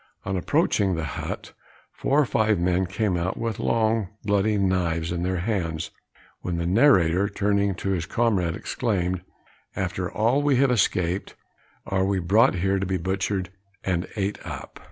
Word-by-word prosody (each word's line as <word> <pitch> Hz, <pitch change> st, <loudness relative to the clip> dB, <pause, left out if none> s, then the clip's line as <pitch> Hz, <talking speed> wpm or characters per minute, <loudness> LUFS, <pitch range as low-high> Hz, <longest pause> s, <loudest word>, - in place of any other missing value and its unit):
On 95 Hz, -, -1 dB
approaching 95 Hz, +1 st, +1 dB
the 80 Hz, -, -2 dB
hut, 80 Hz, -, -5 dB, 0.4 s
four 140 Hz, -, +1 dB
or 150 Hz, -, +4 dB
five 110 Hz, -3 st, +2 dB
men 90 Hz, +1 st, +1 dB
came 100 Hz, 0 st, 0 dB
out 90 Hz, +2 st, -2 dB
with 115 Hz, -3 st, -3 dB
long 110 Hz, -2 st, +1 dB, 0.2 s
bloody 105 Hz, +1 st, +2 dB
knives 85 Hz, -4 st, 0 dB
in 85 Hz, -1 st, -2 dB
their 90 Hz, +1 st, 0 dB
hands, 85 Hz, -6 st, -2 dB, 0.5 s
when 90 Hz, -1 st, -3 dB
the 85 Hz, -, -1 dB
narrator, 95 Hz, -, +4 dB
turning 100 Hz, -1 st, +1 dB
to 95 Hz, -, -3 dB
his 85 Hz, -3 st, -1 dB
comrade, 95 Hz, -8 st, +1 dB
exclaimed, 95 Hz, -6 st, -1 dB, 0.5 s
"After -, -, -2 dB
all 115 Hz, +6 st, +2 dB
we 145 Hz, -2 st, +3 dB
have 135 Hz, +1 st, +3 dB
escaped, 90 Hz, -4 st, 0 dB, 0.5 s
are 95 Hz, -1 st, 0 dB
we 95 Hz, 0 st, +1 dB
brought 95 Hz, +5 st, +4 dB
here 95 Hz, +2 st, +1 dB
to 95 Hz, -, -1 dB
be 95 Hz, 0 st, 0 dB
butchered 95 Hz, +1 st, -2 dB, 0.3 s
and 90 Hz, -2 st, -1 dB
ate 100 Hz, -1 st, -2 dB
up?" -, -, -8 dB
95 Hz, 160 wpm, -25 LUFS, 90-105 Hz, 0.5 s, or